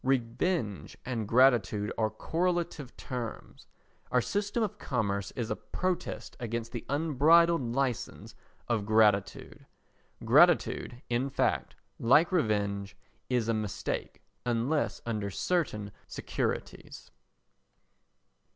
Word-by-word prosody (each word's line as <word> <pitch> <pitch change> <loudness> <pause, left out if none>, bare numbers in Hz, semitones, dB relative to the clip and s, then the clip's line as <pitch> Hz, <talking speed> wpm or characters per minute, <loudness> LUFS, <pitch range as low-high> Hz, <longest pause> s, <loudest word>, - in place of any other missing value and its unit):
Revenge 125 - -1
and 115 -4 -3
gratitude 115 -4 +3
are 110 -1 +1
correlative 165 - -2
terms. 125 -4 -7 0.4
Our 125 - +3
system 205 - -1
of 210 - -3
commerce 100 -6 -1
is 120 -2 -3
a - - 0
protest 185 -1 -3
against 115 -1 -4
the 120 - -5
unbridled 160 +3 +4
licence 125 0 -2 0.3
of 110 -4 -1
gratitude. 105 -3 +2 0.6
Gratitude, 120 +1 +4
in 125 +3 +1
fact, - - 0 0.2
like 150 +10 +5
revenge, 100 - 0 0.3
is 125 -3 +1
a 115 - +2
mistake 110 -3 -4 0.2
unless 125 +5 0
under 105 -4 -2
certain 105 - -1 0.2
securities. - - -4
120 Hz, 100 wpm, -30 LUFS, 110-150 Hz, 0.6 s, like